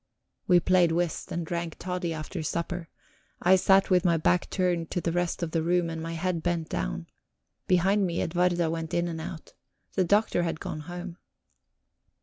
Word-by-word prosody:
We 180 Hz, -2 st, +6 dB
played 175 Hz, -1 st, +3 dB
whist 170 Hz, 0 st, -1 dB
and 170 Hz, -1 st, -2 dB
drank 170 Hz, 0 st, -3 dB
toddy 180 Hz, -2 st, -3 dB
after 160 Hz, +2 st, -5 dB
supper; 170 Hz, +2 st, -3 dB, 0.5 s
I 185 Hz, +2 st, +5 dB
sat 195 Hz, +1 st, +4 dB
with 180 Hz, -1 st, +4 dB
my 170 Hz, -3 st, +3 dB
back 175 Hz, +3 st, +1 dB
turned 175 Hz, -3 st, 0 dB
to -, -, -1 dB
the 170 Hz, -, -1 dB
rest 175 Hz, 0 st, -1 dB
of 165 Hz, -, -2 dB
the 165 Hz, -, +1 dB
room, 170 Hz, 0 st, +1 dB
and 165 Hz, 0 st, -5 dB
my 165 Hz, +1 st, -4 dB
head 170 Hz, 0 st, -1 dB
bent 170 Hz, -1 st, -1 dB
down; 80 Hz, +8 st, -3 dB, 0.6 s
behind 190 Hz, +2 st, +3 dB
me 170 Hz, -1 st, -2 dB
Edwarda 175 Hz, -1 st, +1 dB
went 165 Hz, -1 st, -3 dB
in 170 Hz, 0 st, +1 dB
and 165 Hz, -1 st, -4 dB
out. 160 Hz, 0 st, -8 dB, 0.4 s
The 190 Hz, -, +2 dB
Doctor 205 Hz, 0 st, +2 dB
had 165 Hz, -2 st, -2 dB
gone 155 Hz, -, -5 dB
home. 175 Hz, +2 st, -7 dB
175 Hz, 180 wpm, -28 LUFS, 165-180 Hz, 0.6 s, We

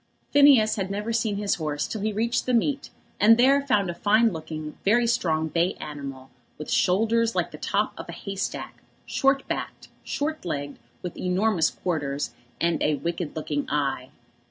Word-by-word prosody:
Phineas 280 Hz, -7 st, +6 dB
had 190 Hz, -2 st, -2 dB
never 210 Hz, +3 st, -3 dB
seen 225 Hz, -3 st, 0 dB
his 205 Hz, -1 st, 0 dB
horse 150 Hz, -1 st, -1 dB
till 215 Hz, -, -5 dB
he 215 Hz, +1 st, 0 dB
reached 235 Hz, +4 st, -1 dB
the 250 Hz, -, +3 dB
meet, 275 Hz, +4 st, 0 dB, 0.3 s
and 225 Hz, +2 st, +7 dB
there 270 Hz, +3 st, +5 dB
found 210 Hz, -8 st, +1 dB
a 175 Hz, -, -2 dB
fine 215 Hz, +5 st, +3 dB
looking, 155 Hz, -1 st, -6 dB
very 235 Hz, +4 st, +4 dB
strong, 165 Hz, -9 st, +1 dB
bay 170 Hz, +3 st, +1 dB
animal, 140 Hz, -3 st, -8 dB, 0.3 s
with 150 Hz, -, -7 dB
shoulders 225 Hz, +5 st, +2 dB
like -, -, 0 dB
the -, -, -10 dB
top -, -, 0 dB
of -, -, -8 dB
a -, -, -5 dB
hay 200 Hz, -1 st, -6 dB
stack, 195 Hz, -, -4 dB, 0.2 s
short 270 Hz, 0 st, +1 dB
backed, -, -, -5 dB
short 310 Hz, +2 st, -3 dB
legged, 145 Hz, -6 st, -4 dB, 0.2 s
with 180 Hz, -, -5 dB
enormous 185 Hz, -1 st, +2 dB
quarters, 145 Hz, -7 st, -3 dB, 0.3 s
and 170 Hz, 0 st, +1 dB
a 150 Hz, -, +2 dB
wicked 170 Hz, +1 st, -4 dB
looking 150 Hz, -2 st, -3 dB
eye. 135 Hz, -3 st, -1 dB
195 Hz, 175 wpm, -25 LUFS, 155-230 Hz, 0.3 s, and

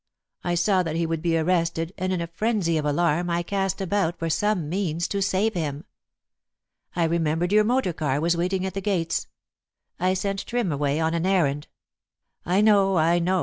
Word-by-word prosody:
I 175 Hz, 0 st, 0 dB
saw 185 Hz, +2 st, +2 dB
that 165 Hz, -3 st, -3 dB
he 165 Hz, 0 st, 0 dB
would 165 Hz, -1 st, -2 dB
be 165 Hz, -1 st, +1 dB
arrested, 165 Hz, 0 st, 0 dB
and 185 Hz, 0 st, -2 dB
in 180 Hz, -2 st, -1 dB
a -, -, -1 dB
frenzy 180 Hz, -1 st, -1 dB
of 150 Hz, -, -3 dB
alarm 170 Hz, +3 st, +1 dB
I 170 Hz, 0 st, 0 dB
cast 195 Hz, 0 st, -1 dB
about 190 Hz, -3 st, 0 dB
for 165 Hz, 0 st, -2 dB
some 210 Hz, -4 st, 0 dB
means 175 Hz, -1 st, -1 dB
to 200 Hz, -, -1 dB
save 200 Hz, +3 st, +1 dB
him. 150 Hz, -4 st, -3 dB, 1.1 s
I 170 Hz, -, +1 dB
remembered 165 Hz, +1 st, 0 dB
your 210 Hz, +1 st, +5 dB
motor 235 Hz, -5 st, +1 dB
car 145 Hz, -4 st, -1 dB
was 170 Hz, +2 st, +1 dB
waiting 185 Hz, +2 st, -1 dB
at 190 Hz, -, -4 dB
the 195 Hz, -, -3 dB
gates. 180 Hz, -5 st, -1 dB, 0.7 s
I 185 Hz, +1 st, +1 dB
sent 195 Hz, +1 st, -3 dB
Trim 235 Hz, -7 st, -1 dB
away 145 Hz, +1 st, 0 dB
on 160 Hz, 0 st, 0 dB
an 170 Hz, +2 st, 0 dB
errand 150 Hz, -7 st, +1 dB, 0.4 s
" -, -, -68 dB, 0.3 s
"I 185 Hz, +3 st, +3 dB
know, 200 Hz, -3 st, +4 dB
I 165 Hz, +2 st, +3 dB
know! 185 Hz, +2 st, +1 dB
175 Hz, 195 wpm, -24 LUFS, 165-195 Hz, 1.1 s, your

